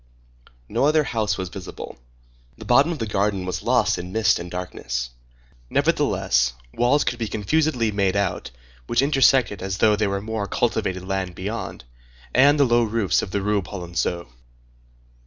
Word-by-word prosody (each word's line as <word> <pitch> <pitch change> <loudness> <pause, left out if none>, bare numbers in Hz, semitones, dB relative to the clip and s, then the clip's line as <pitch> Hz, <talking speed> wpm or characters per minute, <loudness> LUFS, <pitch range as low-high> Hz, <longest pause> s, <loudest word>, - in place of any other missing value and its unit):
No - - +1
other 155 0 +3
house 110 -6 -1
was 95 -1 -4
visible. 90 0 -8 0.6
The 110 - -10
bottom 140 +9 +4
of 165 - -3
the 115 - -3
garden 100 -2 -1
was 90 - -3
lost - - +2
in 90 +1 -7
mist 110 +1 +2
and 85 0 -7
darkness. 85 -9 -4 0.6
Nevertheless, 60 0 +1 0.2
walls 125 +5 +2
could 120 - -2
be 115 - -2
confusedly 115 +2 0
made 100 -2 0
out, 100 -1 -1 0.4
which 120 +3 +2
intersected 135 -6 +3
as 95 0 -3
though 105 0 +4
there 105 -1 0
were 100 0 -1
more 110 0 -4
cultivated 95 -6 -1
land 95 -2 -2
beyond, 105 - -5 0.5
and 145 +3 +5
the 140 - +6
low 120 -1 +3
roofs 110 -3 +1
of - - -5
the 100 +1 -2
Rue 105 0 +1
Polonceau. 85 -2 -3
105 Hz, 160 wpm, -23 LUFS, 95-120 Hz, 0.6 s, the